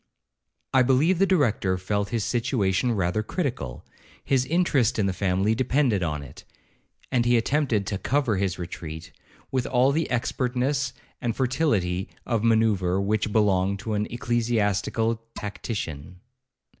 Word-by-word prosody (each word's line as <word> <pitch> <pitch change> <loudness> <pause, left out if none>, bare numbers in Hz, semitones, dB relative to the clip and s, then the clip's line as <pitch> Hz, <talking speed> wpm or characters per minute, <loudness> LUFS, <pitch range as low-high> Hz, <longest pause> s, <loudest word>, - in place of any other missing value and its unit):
'I 130 - +6
believe 140 +8 +3
the 195 - +4
Director 115 - +2
felt 100 +2 -2
his 115 -3 -1
situation 115 -2 +1
rather 95 0 0
critical; 110 - -4 0.4
his 130 -2 +1
interest 150 -7 +2
in 105 - +2
the 95 - 0
family 95 +3 +1
depended 125 -3 +1
on 75 -4 -2
it, 70 - -12 0.7
and 125 -2 +2
he 120 0 +4
attempted 120 -4 +1
to 100 -1 -3
cover 130 -6 +1
his 95 -2 -1
retreat 85 -2 -7 0.4
with 130 -2 0
all 130 +2 +3
the 160 +3 0
expertness 125 +2 -1 0.3
and 120 -3 -1
fertility 115 - 0 0.2
of 115 -2 0
manoeuvre 110 -5 +2
which 105 +2 0
belong 100 -2 +2
to 105 +3 -4
an 105 0 0
ecclesiastical 115 -1 0
tactician. 90 -6 -5
110 Hz, 135 wpm, -25 LUFS, 95-125 Hz, 0.7 s, I